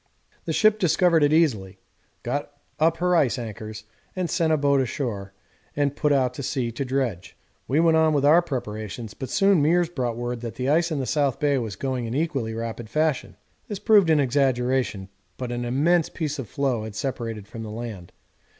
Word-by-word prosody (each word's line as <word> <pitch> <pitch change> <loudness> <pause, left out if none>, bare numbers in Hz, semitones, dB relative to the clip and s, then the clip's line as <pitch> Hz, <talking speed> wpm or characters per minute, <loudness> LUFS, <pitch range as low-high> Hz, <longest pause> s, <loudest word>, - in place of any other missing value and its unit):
The - - -2
ship 215 0 +3
discovered 175 -2 +3
it 145 0 +4
easily, 110 - +1 0.5
got - - -3 0.3
up 165 +1 +3
her 180 +1 +2
ice 140 -6 +2
anchors, 110 -2 -7 0.4
sent 170 -2 +1
a 155 - +3
boat 140 -1 +3
ashore, 110 -7 -3 0.4
and 145 -1 0
put 150 - +1
out 130 -3 +2
to 135 - -6
sea 125 -3 -2
to 115 +4 -3
dredge. 130 -9 -3 0.3
We 140 +4 +2
went 165 -1 +4
on 160 0 +4
with 140 -1 +2
our 160 +4 +6
preparations, 110 - -5
but 130 - -7
soon 195 -4 +3
Meares 170 +3 +2
brought 120 -6 -2
word 120 0 -4
that 115 -2 -6
the 130 +2 -2
ice 165 +3 +3
in 155 - -1
the 130 - -2
south 140 -2 0
bay 145 -2 +2
was 110 -5 -4
going 130 +1 -3
in 115 - -4
an - - +2
equally 135 -9 -2
rapid 115 0 -5
fashion. 150 -11 -1 0.3
This 205 - -4
proved 205 -4 +4
an 155 -2 +4
exaggeration, 130 -6 0 0.3
but 125 -2 -4
an 120 0 -3
immense 155 +7 +2
piece 150 -2 -4
of 130 - -6
floe 135 -6 -1
had 110 -2 -7
separated 115 -3 -4
from 115 - -8
the 110 - -6
land. 110 -5 -7
135 Hz, 195 wpm, -24 LUFS, 115-155 Hz, 0.5 s, our